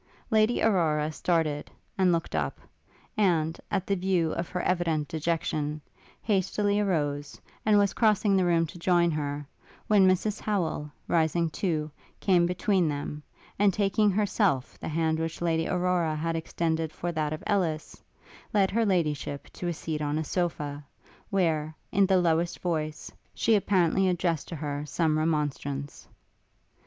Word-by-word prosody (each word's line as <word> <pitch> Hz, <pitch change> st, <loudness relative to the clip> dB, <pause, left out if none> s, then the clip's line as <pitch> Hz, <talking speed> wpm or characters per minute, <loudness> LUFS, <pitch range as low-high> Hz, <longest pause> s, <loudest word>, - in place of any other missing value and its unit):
Lady 220 Hz, +2 st, +3 dB
Aurora 160 Hz, -7 st, +2 dB
started, 155 Hz, -3 st, 0 dB, 0.3 s
and 185 Hz, -2 st, +3 dB
looked 170 Hz, -1 st, -1 dB
up; 75 Hz, -3 st, -2 dB, 0.6 s
and, 170 Hz, -6 st, +1 dB
at 195 Hz, -2 st, -1 dB
the 200 Hz, -, +1 dB
view 180 Hz, -3 st, +1 dB
of 170 Hz, 0 st, -3 dB
her 180 Hz, -, -3 dB
evident 165 Hz, -4 st, 0 dB
dejection, 155 Hz, -1 st, -2 dB, 0.4 s
hastily 205 Hz, 0 st, +1 dB
arose, 145 Hz, -7 st, -1 dB, 0.3 s
and 210 Hz, -1 st, +6 dB
was 200 Hz, -1 st, +3 dB
crossing 210 Hz, -3 st, +3 dB
the 190 Hz, -, +3 dB
room 170 Hz, -1 st, +3 dB
to 170 Hz, +2 st, -10 dB
join 175 Hz, -1 st, +3 dB
her; 145 Hz, -1 st, -3 dB, 0.4 s
when 200 Hz, -3 st, +5 dB
Mrs 200 Hz, +3 st, +1 dB
Howel, 170 Hz, -7 st, -1 dB, 0.2 s
rising 165 Hz, 0 st, +1 dB
too, 155 Hz, -5 st, -1 dB, 0.3 s
came 175 Hz, -3 st, +3 dB
between 180 Hz, 0 st, +1 dB
them, 145 Hz, +1 st, -4 dB, 0.4 s
and 205 Hz, -1 st, +5 dB
taking 205 Hz, +2 st, +2 dB
herself 200 Hz, -, +1 dB
the -, -, -6 dB
hand 160 Hz, 0 st, 0 dB
which 165 Hz, 0 st, -3 dB
Lady 165 Hz, -1 st, 0 dB
Aurora 180 Hz, -3 st, +1 dB
had 165 Hz, +2 st, -2 dB
extended 160 Hz, -1 st, -1 dB
for 175 Hz, +2 st, -4 dB
that 155 Hz, -2 st, -1 dB
of 155 Hz, -, -5 dB
Ellis, 175 Hz, -7 st, -1 dB, 0.5 s
led 195 Hz, -2 st, +3 dB
Her 230 Hz, +1 st, +2 dB
Ladyship 150 Hz, -6 st, -1 dB
to 175 Hz, -, -5 dB
a 175 Hz, -, 0 dB
seat 155 Hz, -1 st, -4 dB
on 150 Hz, 0 st, -1 dB
a 160 Hz, -, -1 dB
sofa, 150 Hz, -4 st, -2 dB, 0.5 s
where, 160 Hz, -5 st, 0 dB, 0.2 s
in 195 Hz, 0 st, +4 dB
the 190 Hz, -1 st, +4 dB
lowest 170 Hz, 0 st, +1 dB
voice, 155 Hz, -3 st, -3 dB, 0.2 s
she 225 Hz, -, +2 dB
apparently 190 Hz, -2 st, +3 dB
addressed 170 Hz, -3 st, 0 dB
to 170 Hz, -, -6 dB
her 145 Hz, -1 st, -3 dB
some 155 Hz, +2 st, 0 dB
remonstrance. 145 Hz, -3 st, -2 dB
170 Hz, 150 wpm, -28 LUFS, 155-190 Hz, 0.6 s, and